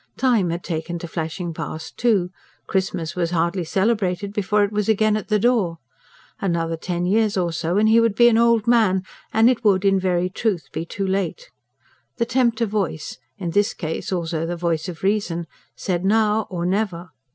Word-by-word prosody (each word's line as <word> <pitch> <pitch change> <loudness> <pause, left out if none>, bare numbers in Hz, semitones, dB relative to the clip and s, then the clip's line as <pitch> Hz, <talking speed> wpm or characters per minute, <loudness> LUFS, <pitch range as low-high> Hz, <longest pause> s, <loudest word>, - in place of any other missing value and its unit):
Time 235 -9 +2
had 170 +1 -3
taken 165 0 -3
to 170 - -7
flashing 165 +1 -4
past, 155 0 -6
too; 205 -7 +1 0.3
Christmas 185 -4 -2
was 175 -2 0
hardly 170 +2 0
celebrated 195 +1 0
before 210 0 +1
it 205 - 0
was 210 0 -1
again 215 0 +3
at 215 - -3
the 215 - +2
door. 210 -7 +1 0.6
Another 165 -3 -1
ten 175 +1 -3
years 210 +2 +2
or 175 -2 0
so 165 +3 -1
and 215 +1 +4
he 225 +1 +6
would 230 -3 +2
be 240 - +6
an 235 - +4
old 230 -1 +3
man, 220 -6 +3 0.3
and 225 +1 +4
it 245 -2 +2
would 200 -2 +3
in 195 -1 +4
very 180 -1 +1
truth 190 -1 -2
be 165 - -4
too 195 +2 -3
late. 195 - -2 0.7
The 235 - +1
tempter 235 -1 +1
voice 195 -10 -3 0.2
in 175 -3 -3
this 205 +4 +1
case 160 +1 -4
also 165 -3 -2
the 175 0 -3
voice 170 0 -1
of 170 -1 -9
reason 190 -4 0 0.3
said: 180 -2 -2
now 215 +1 +2
or 175 -2 -3
never! 180 -3 -1
190 Hz, 185 wpm, -22 LUFS, 170-215 Hz, 0.7 s, he